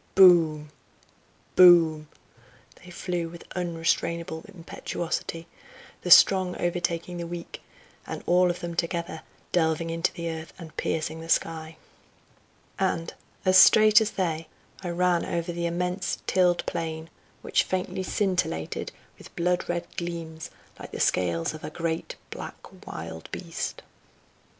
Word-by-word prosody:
boom! 160 -5 +6 0.8
boom!" 165 -4 +7 0.8
they 180 - -12
flew 175 -1 -3
with 170 0 -11
unrestrainable 170 -1 -1
impetuosity, 170 -2 -5 0.6
the 180 - -4
strong 185 0 +7
overtaking 175 0 -2
the 170 -1 -4
weak, 170 0 -7 0.5
and - - -6
all 180 +1 +4
of 175 - -3
them 175 0 -4
together 170 -1 -2 0.3
delving 165 -1 +1
into 165 +2 0
the 170 -2 -5
earth 160 -1 -6
and 165 -3 -11
piercing 160 0 -2
the 165 - -10
sky. 160 -1 0 1.0
And, 175 -3 -1 0.3
as 185 0 +7
straight 215 +2 +8
as 215 - +1
they, 165 -4 -2 0.3
I 180 - -4
ran 175 0 +2
over 170 0 -2
the 170 0 -2
immense 180 +2 -2
tilled 180 -2 +2
plain, 160 0 -4 0.3
which - - +2
faintly 185 0 -2
scintillated 185 - -1 0.3
with - - -14
blood 180 +1 0
red 175 0 -1
gleams 165 -3 -5 0.3
like - - -8
the - - -7
scales 85 - +1
of 155 - -10
a - - -4
great 165 +1 -3 0.2
black - - -7 0.3
wild 80 0 -7
beast. - - -5
170 Hz, 130 wpm, -26 LUFS, 160-180 Hz, 1.0 s, straight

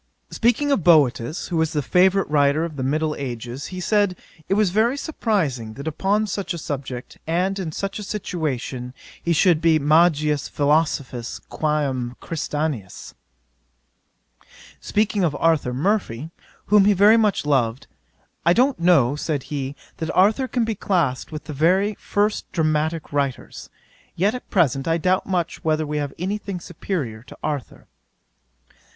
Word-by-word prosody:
'Speaking 245 +5 +1
of 220 - +1
Boetius, 150 -3 +3
who 175 - -1
was 160 -1 +1
the 150 -2 0
favourite 190 +6 +3
writer 145 +2 +2
of 160 -3 -7
the 135 - -4
middle 155 +4 0
ages, 125 0 -5
he 185 - -7
said 205 0 +1 0.3
it 195 - +3
was 210 -3 +2
very 230 +7 +2
surprizing, 165 - -1
that 140 +3 -7
upon 195 +7 +1
such 195 -2 -3
a - - -5
subject, 135 -5 -6
and 185 +4 0
in 170 -4 -3
such 195 +6 -4
a - - -5
situation, 135 - -4 0.3
he 170 - -1
should 170 0 +4
be 165 -1 +4
magis 150 -1 +3
philosophius 145 -5 0
quÃ 150 -1 0
m 125 -2 -4
Christianus. 150 - -4 1.7
'Speaking 210 -1 0
of 155 -4 +1
Arthur 160 -5 +2
Murphy, 155 - -1 0.3
whom 205 -1 +5
he 205 - +5
very 205 +3 +6
much 215 -8 +2
loved, 130 -4 +1 0.6
"I 170 - +5
don't 255 +3 +2
know 160 -7 +4
(said 150 -2 -2
he,) 140 -1 -3 0.2
that 160 -1 -4
Arthur 215 +8 +4
can 245 -2 0
be 225 - -1
classed 170 -10 -1
with 155 -1 -6
the 150 - -7
very 185 +8 +2
first 205 +1 -1
dramatick 155 -1 -1
writers; 140 -3 -3 0.5
yet 195 +5 +2
at 250 - -8
present 140 - +1
I 165 0 +2
doubt 185 +3 +1
much 180 -2 -2
whether 155 -1 +1
we 150 0 -3
have 145 -2 -2
any 195 +5 -2
thing 195 -3 -5
superiour 155 - -4
to 125 - -14
Arthur." 145 -5 -4
160 Hz, 155 wpm, -22 LUFS, 140-195 Hz, 1.7 s, very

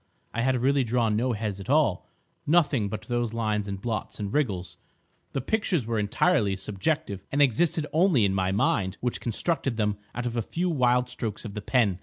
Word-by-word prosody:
I 115 - -1
had 130 +1 +2
really 140 0 +3
drawn 115 -2 +1
no 120 +3 +1
heads 105 -2 -3
at 95 - -9
all—nothing 140 - +1
but 110 +1 -5
those 120 0 -2
lines 105 -3 -1
and 100 -1 -4
blots 110 0 -4
and 100 -1 -4
wriggles. 95 - -1 0.6
The 135 - -1
pictures 180 - 0
were 115 -1 -1
entirely 105 - +2
subjective, 100 - -2
and 140 - 0
existed 150 +4 +3
only 160 - +4
in 95 - +1
my 95 -1 +1
mind 95 -1 +1
which 125 -1 -2
constructed 130 +1 -1
them 105 -2 0 0.2
out 120 - -3
of 120 -1 -2
a 120 - +1
few 175 - -2
wild 125 -4 +2
strokes 115 -3 -4
of 105 - -6
the 105 - -5
pen. 105 -6 +2
115 Hz, 190 wpm, -27 LUFS, 105-135 Hz, 0.6 s, only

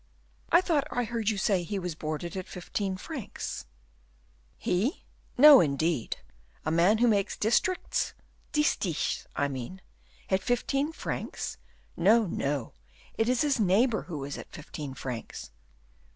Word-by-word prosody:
"I 345 - +7
thought 325 -6 +1
I 245 -1 0
heard 225 -1 -1
you 215 - -1
say 195 -1 +2
he 200 +4 -3
was 180 -3 -3
boarded 155 +2 -4
at 185 -1 -4
fifteen 190 +1 -3
francs." 265 - -6 0.9
"He! 210 - -1 0.3
no, 290 +1 +10
indeed; 150 -3 0 0.5
a 155 - 0
man 175 +6 +4
who 240 +2 +4
makes 200 -3 +1
districts 240 - +1 0.4
distichs 215 - 0
I 140 - +1
mean 135 +7 -6 0.5
at 190 0 +3
fifteen 275 +7 0
francs! - - -4 0.4
No, 215 +6 +5
no! 140 - -2 0.4
it 225 +2 +1
is 250 -1 +2
his 285 -4 +2
neighbor 215 +4 +3
who 150 -5 -4
is 140 +1 -5
at - - -10
fifteen 145 -2 -7
francs." 125 - -6
195 Hz, 135 wpm, -29 LUFS, 160-245 Hz, 0.9 s, no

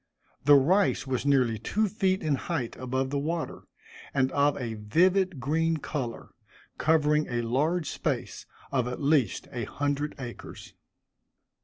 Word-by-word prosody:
The 145 0 +8
rice 180 +9 +3
was 130 +1 -2
nearly 125 -6 +3
two 215 - 0
feet 190 -2 0
in 155 -2 +1
height 130 -3 -3
above 130 +1 -2
the 140 - 0
water, 165 +3 -4 0.5
and 130 -1 +2
of 145 0 +2
a 120 -4 -4
vivid 175 - +2
green 160 +5 +1
color, 130 -6 -5 0.5
covering 150 -1 +3
a 120 -1 -1
large 150 +8 0
space, - - -3 0.2
of 130 -3 +1
at 125 - -4
least 140 -7 +1
a 120 -3 -3
hundred 145 +3 -2
acres. 125 -3 -9
145 Hz, 140 wpm, -28 LUFS, 125-160 Hz, 0.5 s, The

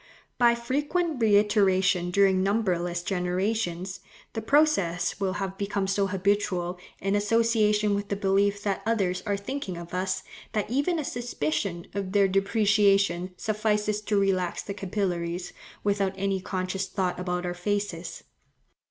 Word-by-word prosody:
By 235 -1 +5
frequent 290 +5 -1
reiteration 195 -4 +3
during 190 0 +3
numberless 180 -4 0
generations, 185 0 -1 0.3
the 225 - -3
process 220 - +2
will 190 -2 0
have 195 -1 -4
become 200 -1 -1
so 195 +1 +1
habitual, 185 -2 0 0.2
in 195 +1 -1
association 210 0 +2
with 200 0 -2
the 200 - -1
belief 200 +1 +1
that 200 -2 -1
others 195 -5 0
are 200 -1 +1
thinking 200 -3 -5
of 170 0 -9
us, 185 +1 -1 0.3
that 210 0 -1
even 285 +7 +1
a 310 - -1
suspicion 175 - -2
of 195 -1 -3
their 200 -1 +5
depreciation 195 -2 +2
suffices 210 0 0
to 210 -1 +1
relax 185 -3 0
the 200 - -5
capillaries, 180 -3 -3 0.3
without 200 -2 +1
any 195 -1 -1
conscious 185 +1 -2
thought 185 -3 -2
about 180 0 -2
our 175 - -2
faces. 180 -2 -3
195 Hz, 135 wpm, -27 LUFS, 185-210 Hz, 0.3 s, By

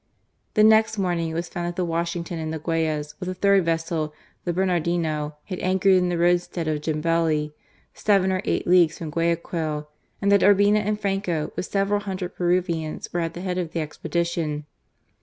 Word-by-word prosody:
The 215 - +5
next 220 0 +5
morning 175 -4 0
it 160 - -5
was 170 +1 -2
found 175 0 -4
that 175 - -4
the 180 -1 0
Washington 170 0 -2
and 155 0 -3
the 160 - -3
Gtmyas, 155 -2 -1
with 185 -1 -4
a 185 - -3
third 200 0 +4
vessel, 165 -2 -1 0.3
the 175 - +1
Bernardino, 170 -4 0
had 185 -3 -6
anchored 190 +1 +3
in 180 -1 +3
the 175 - -1
roadstead 175 -1 +1
of 155 -1 -1
Jambeli, 155 -1 0 0.4
seven 195 -3 +2
or 185 0 0
eight - - -1
leagues 175 -3 +4
from 160 -2 -6
Guayaquil, 165 -2 -1 0.3
and 200 0 +1
that 200 - +5
Urbina 205 +1 +5
and 210 0 -1
Franco 195 -6 -1
with - - -3
several 200 +1 +1
hundred 190 -3 -5
Peruvians 175 -3 -1
were 175 - 0
at 165 -1 -2
the 175 - -6
head 185 -1 -2
of 170 -2 -4
the 170 - -1
expedition. 155 0 -2
175 Hz, 185 wpm, -24 LUFS, 160-185 Hz, 0.4 s, The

